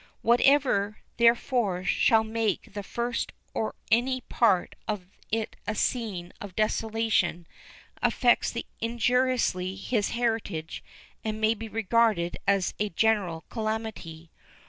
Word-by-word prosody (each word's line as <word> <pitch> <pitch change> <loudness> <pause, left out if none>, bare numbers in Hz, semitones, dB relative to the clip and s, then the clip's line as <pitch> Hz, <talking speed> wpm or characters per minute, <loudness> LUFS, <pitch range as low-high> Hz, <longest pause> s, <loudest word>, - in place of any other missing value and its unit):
Whatever, 240 -4 +3 0.2
therefore, 235 -5 +2
shall 220 +3 +4
make 220 -1 -2
the 205 - -4
first 235 +4 -3 0.2
or 220 - -2 0.2
any 255 +3 +2
part 210 -9 +2
of 210 -4 -3 0.3
it 220 0 -1
a - - -1
scene 200 -8 -2
of 200 -3 -8
desolation 215 -5 0 0.6
affects 240 -1 +2 0.2
injuriously 235 -5 +1
his 205 +2 -1
heritage 225 -9 -2 0.4
and 215 0 -3
may 220 +1 +3
be 225 0 -7
regarded 220 -5 +2
as 195 -2 +2
a 210 0 0
general 195 -4 +1
calamity. 215 -8 -4
220 Hz, 110 wpm, -27 LUFS, 195-235 Hz, 0.6 s, shall